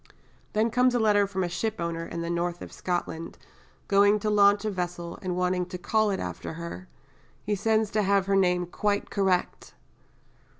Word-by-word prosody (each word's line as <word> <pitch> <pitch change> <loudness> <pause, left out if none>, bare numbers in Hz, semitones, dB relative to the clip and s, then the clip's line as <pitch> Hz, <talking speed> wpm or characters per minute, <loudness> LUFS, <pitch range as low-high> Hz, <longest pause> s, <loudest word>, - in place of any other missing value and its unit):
Then 220 +2 +2
comes 250 +1 +3
a - - +2
letter 205 -2 +3
from 190 -1 -2
a - - 0
shipowner 170 -3 -3
in 170 - -5
the 170 - -3
north 175 0 -2
of - - -10
Scotland 170 -2 -4 0.5
going 205 +1 +5
to 215 0 0
launch 205 0 +4
a 215 - 0
vessel, 175 -2 -4
and 185 -2 -3
wanting 180 0 0
to 180 - -6
call 215 +4 +1
it 195 - -1
after - - -5
her, 160 - -7 0.7
sends 220 +1 +1
to 215 - +1
have 200 -1 +2
her 195 0 +1
name 180 -2 +2
quite 205 +3 -1
"correct." 190 -3 -1
190 Hz, 175 wpm, -27 LUFS, 175-210 Hz, 0.7 s, going